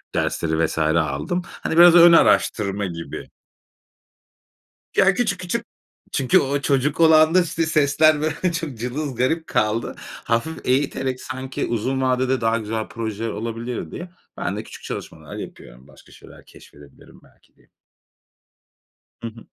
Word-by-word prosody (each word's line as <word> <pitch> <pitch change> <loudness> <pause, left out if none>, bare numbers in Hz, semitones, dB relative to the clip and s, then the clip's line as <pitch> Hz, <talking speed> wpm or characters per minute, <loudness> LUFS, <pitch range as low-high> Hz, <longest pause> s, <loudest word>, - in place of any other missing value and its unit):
dersleri 80 0 0
vs. 80 - -5
aldım. 80 - 0
Hani 160 - -5
biraz 175 0 +8
ön 170 0 +9
araştırma 100 -10 +3
gibi. 85 -3 -7 1.7
Ya, 195 0 +5
küçük 210 -4 -1
küçük, 185 +6 -3 0.5
çünkü 130 -3 +3
o 140 +1 -1
çocuk 140 +3 0
olanda, 160 +2 +6
işte, 165 -1 -1
sesler, 155 0 +3
böyle, 160 +4 -1
çok 160 -6 -4
cılız, 130 +4 -4
garip 160 +7 0
kaldı. 110 +2 -1
Hafif 115 +8 -4
eğiterek 130 -1 -1
sanki 130 0 -5
uzun 130 +4 -2
vadede 130 0 +1
daha 115 0 +1
güzel 110 0 -4
projeler 115 -1 -4
olabilir 115 +2 -5
diye, 175 +1 -7 0.3
ben - - -3
de - - -5
küçük - - -13
çalışmalar - - -8
yapıyorum - - -10
başka - - -19
şeyler - - -16
keşfedebilirim 75 -1 -17
belki - - -27
diye. - - -28 1.5
Hı 115 - -4
hı. 115 0 -12
130 Hz, 135 wpm, -22 LUFS, 110-160 Hz, 1.7 s, ön